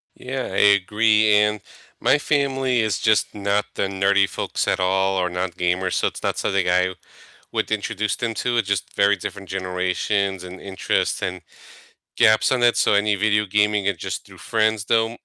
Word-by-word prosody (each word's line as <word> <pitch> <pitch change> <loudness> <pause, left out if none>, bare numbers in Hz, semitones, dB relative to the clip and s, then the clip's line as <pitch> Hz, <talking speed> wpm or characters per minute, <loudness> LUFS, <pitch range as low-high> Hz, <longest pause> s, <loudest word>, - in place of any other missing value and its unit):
Yeah, 130 0 -5
I - - -2
agree, 105 +2 +3
and 105 0 +3 0.4
my 150 - +3
family 135 -4 0
is 110 -2 -1
just 110 -3 +1
not 100 0 -1
the - - -2
nerdy 100 0 +2
folks - - -3
at - - +1
all, 95 +1 +1
or 90 -1 +1
not 90 0 -4
gamers, 90 +1 -1
so, - - +1
it's - - -7
not - - -2
something 95 -2 0
I 90 +1 +2 0.6
would - - -2
introduce 110 0 -1
them 115 -2 -3
to, 120 +2 -1
it's 110 -3 0
just 100 -3 -2
very 100 +1 +3
different 100 +1 -7
generations, 95 +1 -2
and 90 +1 -9
interests, 95 -1 -2
and 95 -1 -4 0.7
gaps 110 +2 +4
in 125 -2 +1
it, 120 - +4
so - - +2
any 105 0 +2
video 105 +1 +1
gaming 105 0 +1
is 100 -4 0
just - - -5
through - - -16
friends 110 -2 0
though. 115 +1 +1
100 Hz, 180 wpm, -22 LUFS, 95-110 Hz, 0.7 s, gaps